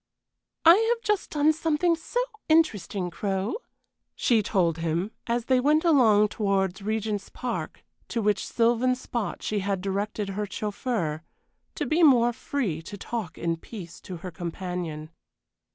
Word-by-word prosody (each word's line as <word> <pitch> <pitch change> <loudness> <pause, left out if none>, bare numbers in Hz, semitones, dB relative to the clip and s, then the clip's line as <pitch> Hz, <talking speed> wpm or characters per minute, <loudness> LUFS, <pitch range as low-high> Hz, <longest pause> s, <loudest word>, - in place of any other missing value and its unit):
"I 335 +3 +9
have 470 -1 +1
just 420 -2 0
done 305 +1 +3
something 325 +2 +1
so 330 +9 -3 0.3
interesting, 205 - +2
Crow," 195 - -2 0.6
she 230 -3 +3
told 175 -5 +1
him, 170 +5 -1 0.2
as 235 0 0
they 260 -1 +3
went 300 +5 +3
along 220 -10 +5
towards 195 -2 0
Regent's 215 -1 -2
Park, 250 -1 -5 0.2
to 235 - -2
which 210 -1 +1
sylvan 240 +2 +2
spot 240 -3 -4
she 210 - -1
had 195 0 -1
directed 200 +2 -2
her 205 +2 -3
chauffeur, 200 -6 -2 0.5
to - - -2
be 320 +3 +1
more 240 -6 +6
free 225 - -2
to 205 +5 -8
talk 205 -5 -5
in 165 0 -1
peace 170 -2 -10
to 180 - -7
her 180 - -4
companion. 170 -2 -5
210 Hz, 145 wpm, -26 LUFS, 190-255 Hz, 0.6 s, I